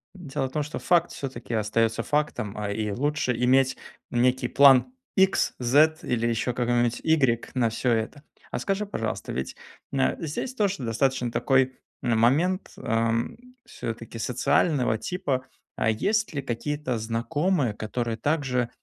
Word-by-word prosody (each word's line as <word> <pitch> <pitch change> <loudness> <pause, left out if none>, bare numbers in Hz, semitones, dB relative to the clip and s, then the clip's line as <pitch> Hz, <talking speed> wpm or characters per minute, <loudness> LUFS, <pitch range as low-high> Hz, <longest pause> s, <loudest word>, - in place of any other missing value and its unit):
Дело 140 -7 -3
в - - -12
том, 150 +2 -1
что 150 - -6
факт 175 -1 +2
всё-таки 125 -4 -6
остается 110 +1 +1
фактом, 135 -9 -1
а 105 -1 -2
и 105 0 -2
лучше 130 +1 0
иметь 130 +2 +3 0.3
некий 125 +1 +2
план 140 - +6 0.2
икс, 190 -1 +3
зет 150 +6 +3
или 120 -1 0
еще 120 +1 0
какой-нибудь 120 -1 +1
игрек 130 -8 +2
на 120 -3 +2
всё 120 +2 0
это. 115 +6 -1 0.3
А - - -2
скажи, 195 +1 -1
пожалуйста, 115 - -4
ведь 65 - -4 0.4
на 135 -1 +1
здесь 165 - -4
тоже 200 - 0
достаточно 125 +1 0
такой, 130 +1 +2 0.3
а, 120 -2 +2
момент, 155 - +2
ам, 115 +1 0 0.3
всё-таки 115 0 -6
социального 125 +1 +1
типа. 140 - -2 0.3
А - - +1
есть 200 - 0
ли 140 - -2
какие-то 135 +1 -3
знакомые, 125 - 0
которые 115 +2 -3
также 130 -4 0
125 Hz, 145 wpm, -26 LUFS, 115-150 Hz, 0.4 s, план